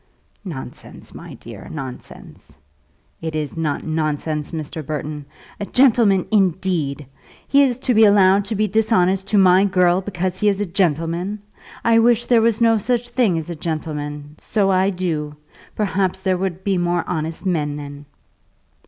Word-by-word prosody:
"Nonsense, 140 -10 -9
my - - -10
dear; - - -11
nonsense." 130 -4 -10 0.6
"It 160 -1 -4
is 150 -2 -3
not 155 -3 -2
nonsense, 155 -1 -2
Mr. 155 -1 -6
Burton. 150 0 -5 0.3
A 205 - -3
gentleman, 225 -7 +3
indeed! 180 -8 0 0.4
He 280 - +4
is 255 -4 +2
to 255 - +1
be 220 0 +6
allowed 200 -1 +5
to 215 - -3
be 215 +1 +1
dishonest 195 -3 +1
to 205 - +1
my 185 0 +5
girl 180 -1 +2
because 185 -1 -3
he 210 - +3
is 200 -1 -1
a 205 - 0
gentleman! 175 +2 -1 0.4
I 230 0 +5
wish 235 0 +3
there 235 -2 +4
was 225 -1 +2
no 225 -1 +4
such 240 +2 -1
thing 240 -8 +1
as 160 +1 -5
a - - -5
gentleman; 150 -2 -5
so 200 -3 0
I 190 +1 +2
do. 165 -6 -3 0.4
Perhaps 190 -2 -1
there 190 -1 +1
would 185 -1 -3
be 195 -3 0
more 175 0 -1
honest 160 +1 -4
men 150 -5 -1
then." 145 0 -9
185 Hz, 160 wpm, -20 LUFS, 155-205 Hz, 0.6 s, be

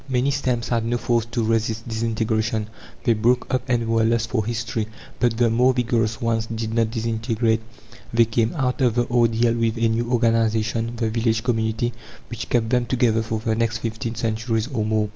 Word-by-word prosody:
Many 130 +2 +1
stems 125 -4 -1
had 115 -2 +1
no 120 +1 0
force 120 -1 0
to 115 0 -2
resist 115 0 0
disintegration: 110 -1 -1 0.3
they 120 - +4
broke 120 +3 +2
up 130 - +2
and 120 -2 +1
were 115 0 +2
lost 115 0 +1
for 110 -4 +1
history. 110 -1 -2 0.3
But 120 -2 +1
the 120 -1 +3
more 125 +3 +3
vigorous 115 -3 0
ones 115 -1 0
did 110 -1 -4
not 115 -1 +2
disintegrate. 115 0 0 0.5
They 115 0 +4
came 115 0 0
out 130 -2 -1
of 120 -3 +3
the 120 0 +2
ordeal 115 -1 +3
with 115 0 0
a 115 0 +2
new 115 +2 -1
organization 115 -1 +1
the 115 -2 -1
village 110 -1 +1
community 115 -1 0 0.4
which 120 -1 -5
kept 115 -2 +1
them 125 -1 +2
together 120 -3 +2
for 110 -1 -3
the 110 -1 0
next 115 +1 0
fifteen 115 0 -4
centuries 115 0 -1
or 110 -4 0
more. 110 -1 0
115 Hz, 190 wpm, -23 LUFS, 110-120 Hz, 0.5 s, they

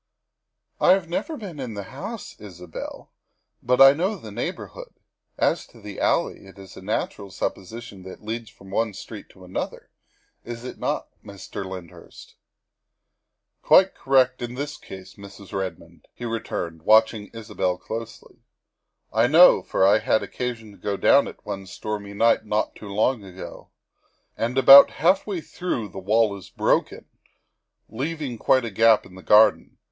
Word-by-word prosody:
" - - -53
I 180 - +7
have 190 -3 -1
never 300 - -3
been 185 -9 -8
in 125 -5 -5
the 100 - -5
house, 215 - -7
Isabel, 90 -5 -9 0.5
but 125 +1 +1
I 135 0 +9
know 185 +8 -1
the 110 - -10
neighborhood. - - -6 0.4
As - - 0
to - - -18
the 105 -2 -9
alley, - - 0
it 95 - -16
is 95 -1 -13
a - - -11
natural 100 0 -3
suppo - - -3
sition 105 0 -10
that 95 - -8
it - - -17
leads 115 +1 -5
from 95 -1 -16
one 110 0 -1
street 105 +2 -10
to 95 -1 -16
another, 90 - -6 0.5
is 120 0 -8
it 125 - -8
not, - - -2
Mr. 100 -1 -8
Lyndhurst?" 95 -3 -11 0.7
" - - -56
Quite 190 +1 +5
correct 130 -2 +2
in 120 0 -5
this 145 +2 -4
case, 95 -1 -12
Mrs. 100 -1 -13
Redmond," 85 -4 -6
he 120 - -7
re 115 -1 -2
turned, 85 -6 -5
watching 110 +2 +3
Isabel 105 -5 -3
closely. 115 +5 -8 0.4
" - - -57 0.3
I 115 +2 +3
know, 165 +7 +7
for 95 - +1
I 100 +3 +5
had 110 - +1
occasion 115 -4 -5
to 100 - -17
go 100 -1 -3
down - - +4
it - - -12
one 95 -1 -6
stormy 100 0 -6
night 115 +1 +3
not 105 0 -1
long 105 +3 0
ago. 95 -1 -10 0.7
And 120 +3 -2
about 135 +1 +9
half 185 +6 +2
way 190 -5 -3
through 130 - -4
the 95 - -8
wall 105 +2 +2
is 95 -2 -12
broken, - - 0 0.8
leaving 135 0 -4
quite 130 +2 +3
a 115 - -5
gap 115 +2 +4
into 90 - -14
the - - -11
garden. 105 +2 +4
110 Hz, 170 wpm, -24 LUFS, 100-125 Hz, 0.8 s, I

